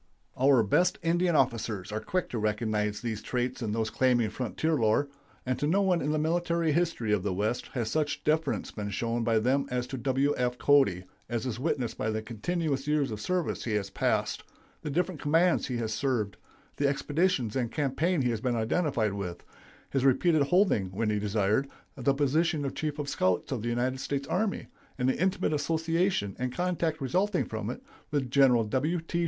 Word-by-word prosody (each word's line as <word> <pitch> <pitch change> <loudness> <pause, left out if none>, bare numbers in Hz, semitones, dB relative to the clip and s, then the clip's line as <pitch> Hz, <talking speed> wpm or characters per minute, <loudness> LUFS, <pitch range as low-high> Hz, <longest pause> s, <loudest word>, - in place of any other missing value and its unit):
Our 130 -2 +4
best 180 - +2
Indian 175 +1 +2
officers 110 -7 0
are 110 - -2
quick 180 +11 -2
to 120 - -3
recognize 105 -1 -1
these 110 -3 -3
traits 125 +3 -2
in 110 -3 -2
those 110 0 -1
claiming 120 -4 +2
frontier 130 +8 -1
lore, 115 +1 +2 0.4
and 130 -1 -1
to 145 - 0
no 195 +6 +3
one 180 -3 +2
in 145 - 0
the 155 - +1
military 170 +1 +1
history 150 -9 0
of 105 - +2
the 95 -1 -2
West 110 +5 -1
has 115 -4 -2
such 150 -2 -1
deference 155 -1 0
been 105 -1 -5
shown 115 +3 -1
by 115 -1 +2
them 130 +5 +1
as 125 -1 -1
to 130 +1 -6
W. 135 +3 +1
F. 125 0 0
Cody, 135 -13 +3 0.3
as 120 0 -2
is 120 -2 -3
witnessed 130 -4 -2
by 110 - 0
the 110 0 -2
continuous 140 +5 -2
years 150 -4 +1
of 105 -1 -5
service 180 +5 -1
he 115 - -1
has 100 -2 -2
passed, - - 0 0.4
the - - -4
different 175 +2 -1
commands 165 +3 +3
he 125 -2 -2
has 110 -2 -2
served, 115 -8 -1 0.4
the 140 - +2
expeditions 145 - 0
and 120 -3 -1
campaigns 150 +3 0
he 125 - +1
has 110 -2 -3
been 125 -1 0
identified 115 - 0
with, 90 -3 -5 0.5
his 135 -2 0
repeated 145 +4 +4
holding, 140 - +3
when 105 +3 -1
he 105 - 0
desired, 105 +5 +1 0.3
the 135 +1 +1
position 150 +2 +1
of 135 - -3
Chief 155 -1 -3
of 145 -1 -3
Scouts 95 -4 0
of 125 -5 -2
the 120 - -2
United 125 +2 -1
States 140 +1 -3
Army, 200 +2 -1 0.3
and 125 -1 0
the 130 - 0
intimate 185 -3 +1
association, 160 - 0
and 125 0 -1
contact 170 -1 -1
resulting 185 +11 +1
from 110 -1 -4
it, 125 - -6 0.3
with 135 -4 -1
Gen. 125 -5 +4
W. 150 +10 0
T. 170 +1 -3
130 Hz, 195 wpm, -29 LUFS, 110-155 Hz, 0.5 s, Our